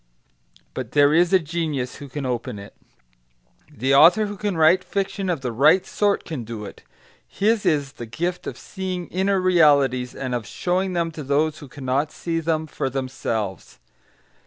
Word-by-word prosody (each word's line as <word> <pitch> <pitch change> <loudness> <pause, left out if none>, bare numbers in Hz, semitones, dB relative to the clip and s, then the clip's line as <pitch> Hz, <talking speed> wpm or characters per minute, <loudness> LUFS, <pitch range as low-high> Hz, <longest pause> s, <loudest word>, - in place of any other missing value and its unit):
But 125 -3 -6
there 145 0 +5
is 170 +2 +4
a 190 - +7
genius 155 -6 -3
who 145 - -10
can 140 +1 -5
open 125 -2 -3
it. 100 0 -11 1.0
The 130 +5 0
author 175 +9 +7
who 205 0 -5
can 200 -2 -2
write 165 +4 +5
fiction 195 0 -2
of 165 -6 -1
the 125 -2 -3
right 150 +10 +4
sort 205 -1 0
can 155 -8 -5
do 110 -2 -7
it; - - -11 0.5
his 215 - 0
is 145 -3 +1
the 120 -3 -9
gift 175 +10 -3
of - - -5
seeing 185 -2 -5
inner 190 +1 +1
realities, 145 -8 +3
and 130 -2 -4
of 120 -3 -3
showing 185 +1 -1
them 170 -1 -1
to 155 - -8
those 150 +3 0
who 145 - -10
cannot 135 +2 -2
see 165 -1 -3
them 160 -1 -1
for 135 -3 -3
themselves. 120 -7 -4
155 Hz, 175 wpm, -23 LUFS, 130-180 Hz, 1.0 s, a